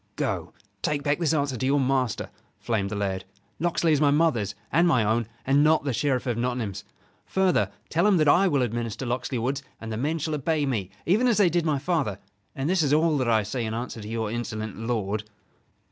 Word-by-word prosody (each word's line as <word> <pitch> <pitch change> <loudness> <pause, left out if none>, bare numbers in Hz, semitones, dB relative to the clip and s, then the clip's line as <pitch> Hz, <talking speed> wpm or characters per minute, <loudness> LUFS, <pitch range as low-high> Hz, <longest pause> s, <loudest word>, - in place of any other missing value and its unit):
"Go, - - -2 0.3
take 145 -1 -1
back 145 +1 +1
this 165 -3 +2
answer 145 -4 0
to 125 - -2
your 140 +1 +3
master," 130 -3 0 0.3
flamed 105 -4 -1
the 105 - -4
lad. 95 -2 -2 0.4
"Locksley 170 -1 +2
is 145 - +2
my 145 - +5
mother's 140 -10 +2 0.2
and 170 +4 +4
my 130 -9 +3
own 110 +1 +1 0.2
and 140 +2 +4
not 155 0 +4
the 140 -3 -1
Sheriff 140 0 0
of 120 -3 -1
Nottingham's. 120 -5 -2 0.4
Further, 185 - +2 0.2
tell 170 +5 +2
him 200 -3 +4
that 155 -2 +3
I 180 +7 +5
will 140 -7 +2
administer 120 +1 -3
Locksley 125 +1 -2
Woods, 130 +4 -1 0.2
and 115 0 -7
the 110 - -3
men 150 +7 0
shall 155 0 -2
obey 150 +1 0
me 110 -9 -2 0.2
even 215 +9 +3
as 235 - +3
they 195 -5 +4
did 170 -1 +1
my 150 -2 +2
father: 135 - -1 0.4
and 135 0 -2
this 185 0 +2
is 145 -2 +2
all 155 +1 +3
that 125 -2 0
I 110 -2 +3
say 115 +4 -3
in 110 0 -3
answer 115 -1 -5
to 105 - -8
your 110 -2 -2
insolent 110 -3 -4
lord." 110 -2 -2
135 Hz, 220 wpm, -26 LUFS, 115-155 Hz, 0.4 s, my